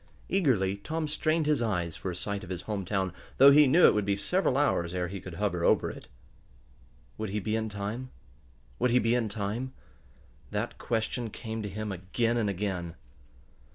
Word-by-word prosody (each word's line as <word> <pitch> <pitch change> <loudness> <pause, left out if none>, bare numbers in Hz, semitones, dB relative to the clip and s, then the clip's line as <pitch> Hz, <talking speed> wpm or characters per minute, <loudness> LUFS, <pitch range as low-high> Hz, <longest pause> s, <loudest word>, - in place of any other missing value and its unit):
Eagerly 115 - +2
Tom 155 +9 -3
strained 155 +1 +1
his 150 -4 +2
eyes 90 -8 -1
for 95 - -5
a 90 - -4
sight 100 +3 -3
of 90 - -9
his 90 -1 -4
home 105 -3 -3
town, 95 -1 -1 0.2
though 140 +1 +9
he 145 0 +7
knew 165 +7 +6
it - - +7
would 105 - +1
be 100 0 +1
several 135 - +1
hours 85 -11 +1
ere 90 -1 -1
he 100 +1 -5
could 90 -2 -8
hover 90 -3 -1
over - - +3
it. - - -11 1.1
Would 110 -2 -2
he 105 +2 -1
be 110 +2 -1
in 110 0 -1
time? 105 +5 -4 0.7
Would 125 - +3
he 120 - +4
be 115 0 +2
in 120 -3 +1
time? 110 +6 -3 0.8
That 105 +3 -3
question 115 +1 -2
came 110 +1 -5
to 105 - -4
him 105 +2 -4
again 105 +6 -1
and 110 -3 +1
again. 90 -3 -3
105 Hz, 190 wpm, -29 LUFS, 95-125 Hz, 1.1 s, though